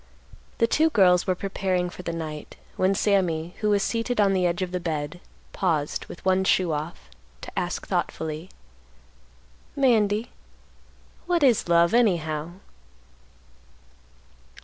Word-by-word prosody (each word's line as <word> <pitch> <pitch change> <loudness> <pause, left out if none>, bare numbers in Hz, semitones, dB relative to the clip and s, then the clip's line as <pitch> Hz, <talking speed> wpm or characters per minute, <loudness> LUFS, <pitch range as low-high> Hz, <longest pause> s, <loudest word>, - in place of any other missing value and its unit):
The 230 - +4
two 310 +7 +3
girls 180 - +4
were 185 - +2
preparing 185 -1 -1
for 180 - -9
the 170 - -4
night, 155 -2 -6 0.2
when 190 +1 +2
Sammy, 175 -5 +1
who 210 - 0
was 200 -1 +2
seated 230 0 -1
on 200 -2 +4
the 185 -1 +2
edge 175 +2 -1
of 180 - -4
the 180 - -2
bed, 155 -1 -4 0.3
paused, 160 -6 -1
with 175 - -11
one 190 0 +3
shoe 185 -2 +2
off, 150 - -5 0.3
to - - -8
ask - - -2
thoughtfully, 160 +3 -3 1.3
"Mandy, 225 -4 +2 1.0
what 345 -3 +2
is 240 -9 +3
love, 170 +1 +4
anyhow?" 170 -8 +1
185 Hz, 130 wpm, -25 LUFS, 165-205 Hz, 1.3 s, The